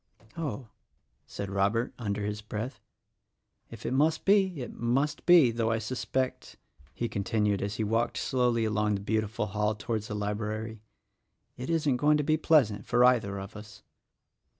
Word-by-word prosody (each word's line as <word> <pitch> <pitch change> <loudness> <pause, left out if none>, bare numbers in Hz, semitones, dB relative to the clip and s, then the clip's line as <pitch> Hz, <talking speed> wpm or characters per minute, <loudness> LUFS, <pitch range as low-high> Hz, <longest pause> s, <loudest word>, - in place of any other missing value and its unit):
"Oh," 140 -7 -4 0.6
said 100 -1 -6
Robert 100 +5 +1
— - - -24
under 105 -3 -2
his 105 0 -3
breath 110 +5 -5 0.5
— - - -54 0.3
"if - - -11
it - - -1
must 155 +4 +2
be, 195 -5 +3
it - - -8
must 135 +5 -1
be; 170 -9 +7
though 115 -1 0
I 115 - +1
suspect," 130 +3 -3 0.4
he 120 - -1
continued 105 0 0
as 100 +1 -2
he 110 - -1
walked 115 +3 0
slowly 125 -3 +1
along 105 -1 +1
the 100 - -4
beautiful 110 +1 -1
hall 105 +1 -1
towards 110 -1 -3
the 105 - -4
library, 105 +1 -3 0.7
"it 125 +4 -6
isn't 150 -6 +1
going 150 +3 +4
to 150 - 0
be 155 +2 +2
pleasant 130 -11 +2
for 125 0 +4
either 110 -6 +3
of 95 0 -8
us." 105 0 -11
115 Hz, 170 wpm, -29 LUFS, 105-130 Hz, 0.7 s, be